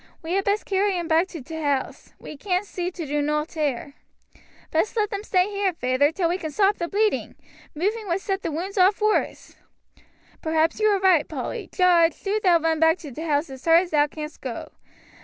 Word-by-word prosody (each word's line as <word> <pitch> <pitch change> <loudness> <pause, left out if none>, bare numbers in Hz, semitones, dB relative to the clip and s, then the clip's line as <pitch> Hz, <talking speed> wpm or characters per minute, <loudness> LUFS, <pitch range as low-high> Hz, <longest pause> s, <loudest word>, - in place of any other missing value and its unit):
We 330 +2 -3
had 390 0 0
best 405 +1 0
carry 390 -1 +1
'em 340 -1 -3
back 330 +2 +3
to 330 -7 -9
t' 320 +3 -7
house; 285 -3 -2
we - - -10
can't 365 +5 -1
see 360 -3 -4
to 350 -3 -7
do 295 +1 -1
nowt 300 +2 -1
here." 285 -4 -2 0.8
"Best 330 +8 0
let 425 0 +1
them 405 0 -4
stay 370 -3 +2
here, 400 -2 0
feyther, 255 0 +1
till 345 0 0
we 355 +3 -1
can 315 - -4
stop 400 +5 +2
the 340 - -2
bleeding. 425 +3 0 0.4
Moving 415 +7 -1
would 345 +1 0
set 390 0 -3
the 335 - -3
wounds 375 +6 -3
off 380 +3 +4
worse." 425 0 -1 0.8
"Perhaps 320 +3 +1
you 430 - +3
are 405 -2 +3
right, 370 -6 +4
Polly. - - -5
Jarge, 345 -3 +3
do 415 +2 -1
thou 360 -4 +5
run 325 -1 0
back 320 +2 +4
to 310 -5 -10
t' 280 - -8
house 300 -2 -1
as 265 -1 -10
hard 330 +1 +6
as 360 - -7
thou 295 -1 +3
canst 300 +1 -8
go. - - -6
340 Hz, 215 wpm, -24 LUFS, 310-390 Hz, 0.8 s, hard